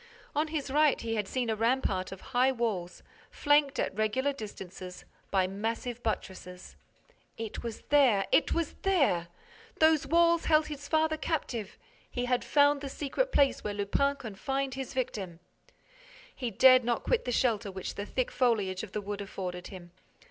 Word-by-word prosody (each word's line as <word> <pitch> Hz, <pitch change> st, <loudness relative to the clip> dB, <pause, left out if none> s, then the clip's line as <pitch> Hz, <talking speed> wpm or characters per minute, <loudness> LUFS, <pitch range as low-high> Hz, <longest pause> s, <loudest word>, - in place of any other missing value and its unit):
On 305 Hz, +2 st, +1 dB
his 300 Hz, -3 st, -3 dB
right, 300 Hz, 0 st, +4 dB
he 230 Hz, -1 st, -3 dB
had 210 Hz, -3 st, -1 dB
seen 250 Hz, +1 st, -2 dB
a -, -, 0 dB
rampart 225 Hz, -5 st, 0 dB
of 195 Hz, -, -9 dB
high 255 Hz, +2 st, +4 dB
walls, 215 Hz, -8 st, -3 dB, 0.3 s
flanked, 290 Hz, -1 st, +2 dB
at -, -, -1 dB
regular 215 Hz, +7 st, 0 dB
distances, 190 Hz, -6 st, -9 dB, 0.2 s
by 190 Hz, -2 st, +2 dB
massive 225 Hz, +5 st, -3 dB
buttresses. 185 Hz, -4 st, -5 dB, 0.6 s
It 225 Hz, -1 st, -5 dB
was 230 Hz, -2 st, -6 dB
there! 255 Hz, -9 st, +4 dB
It -, -, +3 dB
was 335 Hz, -3 st, -1 dB
there! 280 Hz, -, +2 dB, 0.5 s
Those 315 Hz, -3 st, +4 dB
walls 335 Hz, +2 st, +3 dB
held 310 Hz, -1 st, +4 dB
his 290 Hz, -1 st, -7 dB
father 315 Hz, 0 st, +2 dB
captive! 240 Hz, -, -3 dB, 0.3 s
He 245 Hz, 0 st, -3 dB
had 250 Hz, 0 st, +1 dB
found 285 Hz, -1 st, +3 dB
the 280 Hz, -, -5 dB
secret 310 Hz, -, -2 dB
place 275 Hz, -1 st, +3 dB
where 205 Hz, -1 st, -3 dB
Lupin 280 Hz, +8 st, +1 dB
confined 270 Hz, +3 st, -3 dB
his 265 Hz, 0 st, -6 dB
victim. 200 Hz, -9 st, -3 dB, 1.0 s
He 250 Hz, -3 st, -3 dB
dared 255 Hz, +4 st, +6 dB
not 235 Hz, 0 st, -1 dB
quit -, -, +1 dB
the 250 Hz, -, -1 dB
shelter 230 Hz, -4 st, +1 dB
which 190 Hz, -1 st, -5 dB
the 205 Hz, +1 st, -6 dB
thick 255 Hz, -2 st, -1 dB
foliage 210 Hz, -7 st, +1 dB
of 220 Hz, -, -9 dB
the 210 Hz, -, -2 dB
wood 205 Hz, 0 st, -5 dB
afforded 180 Hz, -3 st, -6 dB
him. 175 Hz, -3 st, -11 dB
245 Hz, 165 wpm, -30 LUFS, 200-280 Hz, 1.0 s, dared